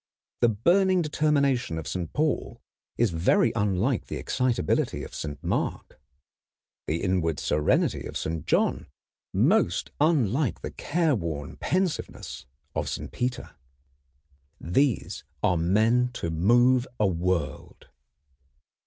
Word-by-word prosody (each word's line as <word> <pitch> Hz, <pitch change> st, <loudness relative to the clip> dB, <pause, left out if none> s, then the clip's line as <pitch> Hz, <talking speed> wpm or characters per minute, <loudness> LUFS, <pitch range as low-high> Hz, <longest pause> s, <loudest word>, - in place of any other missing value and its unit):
The 120 Hz, -, +4 dB
burning 180 Hz, -, +3 dB
determination 140 Hz, -, +1 dB
of 80 Hz, -, -5 dB
Saint 90 Hz, -3 st, -4 dB
Paul 155 Hz, -1 st, -1 dB, 0.4 s
is 115 Hz, -4 st, +2 dB
very 85 Hz, +7 st, +3 dB
unlike 105 Hz, +3 st, 0 dB
the -, -, -5 dB
excitability 125 Hz, -10 st, 0 dB
of -, -, -9 dB
Saint 75 Hz, -2 st, -6 dB
Mark; -, -, -3 dB, 0.9 s
the 80 Hz, +2 st, -1 dB
inward 85 Hz, -5 st, 0 dB
serenity 75 Hz, 0 st, +1 dB
of -, -, -5 dB
Saint 80 Hz, -1 st, -4 dB
John -, -, +1 dB, 0.4 s
most 90 Hz, +3 st, +2 dB
unlike 135 Hz, -, +2 dB
the -, -, -5 dB
careworn 100 Hz, -, -1 dB
pensiveness 180 Hz, -, -3 dB, 0.3 s
of -, -, -2 dB
Saint -, -, -5 dB
Peter. 125 Hz, 0 st, -3 dB, 1.1 s
These 120 Hz, -, 0 dB, 0.2 s
are 90 Hz, -, +3 dB
men 110 Hz, +9 st, +2 dB
to 85 Hz, -8 st, -3 dB
move 120 Hz, +9 st, +3 dB
a 105 Hz, -, +3 dB
world. 85 Hz, -5 st, -2 dB
110 Hz, 110 wpm, -26 LUFS, 85-135 Hz, 1.1 s, The